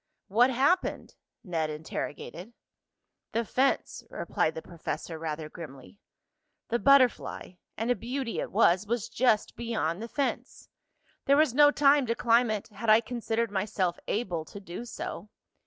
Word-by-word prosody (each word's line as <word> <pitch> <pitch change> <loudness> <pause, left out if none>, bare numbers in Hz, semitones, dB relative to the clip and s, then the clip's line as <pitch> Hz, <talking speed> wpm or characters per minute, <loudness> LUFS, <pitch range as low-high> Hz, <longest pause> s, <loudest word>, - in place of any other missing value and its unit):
"What 235 +6 +5
happened?" 275 +9 +1 0.3
Ned 165 -6 -1
interrogated. 160 +6 -6 0.8
"The 230 +1 0
fence," 265 +5 0
replied 160 - -1
the 160 - -5
professor 165 -1 -6
rather 155 -1 -4
grimly. 155 +2 -11 0.7
"The 235 - +1
butterfly, 270 -8 +3 0.3
and 225 +3 0
a - - +3
beauty 240 +3 -4
it - - -4
was, 185 +4 +3
was 235 0 -1
just 235 -3 +1
beyond 220 -7 -2
the 230 - -5
fence. 280 +3 -3 0.6
There 280 +1 +5
was 305 -5 +4
no 290 +2 +7
time 285 -2 +4
to 230 - 0
climb 235 0 +3
it, 215 -1 -3
had 215 +2 -4
I 215 +1 +8
considered 230 -2 -2
myself 190 -3 -1
able 185 -7 -1
to 200 - -10
do 190 +4 -8
so. 210 -3 -6
225 Hz, 145 wpm, -28 LUFS, 175-245 Hz, 0.8 s, I